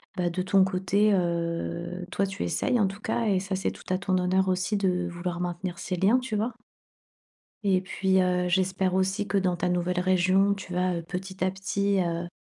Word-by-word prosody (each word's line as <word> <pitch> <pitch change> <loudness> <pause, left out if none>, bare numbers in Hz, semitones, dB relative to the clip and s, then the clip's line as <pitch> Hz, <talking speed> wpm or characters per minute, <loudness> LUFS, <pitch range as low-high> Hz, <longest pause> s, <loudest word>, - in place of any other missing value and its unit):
bah, 180 -2 0
de 185 +2 -2
ton 190 +1 +4
côté, 190 +3 +2
heu, 170 0 -2
toi, 200 - 0
tu 190 - -4
essayes 230 - 0
en 200 - +3
tout 195 +2 -7
cas, 235 - -1
et 200 -3 +2
ça, 190 0 -3
c'est 190 - -1
tout - - -13
à 185 - +2
ton 185 0 0
honneur 185 +1 +2
aussi 185 +3 0
de 180 -3 0
vouloir 175 0 -4
maintenir 175 0 -3
ces 185 -1 -3
liens, 210 +8 +4
tu 240 -5 -3
vois? 225 +2 -1 1.1
Et 190 -2 +3
puis, 190 0 +1
heu, 180 0 +1
j'espère 185 0 +1
aussi 190 +2 0
que 200 - +1
dans 185 -2 +1
ta 180 +1 -1
nouvelle 180 0 0
région, 185 +2 +3
tu 190 -2 -8
vas 180 -1 0
petit 190 +2 -5
à 185 - +2
petit 195 +1 0
heu 170 0 -2
185 Hz, 205 wpm, -27 LUFS, 180-195 Hz, 1.1 s, ton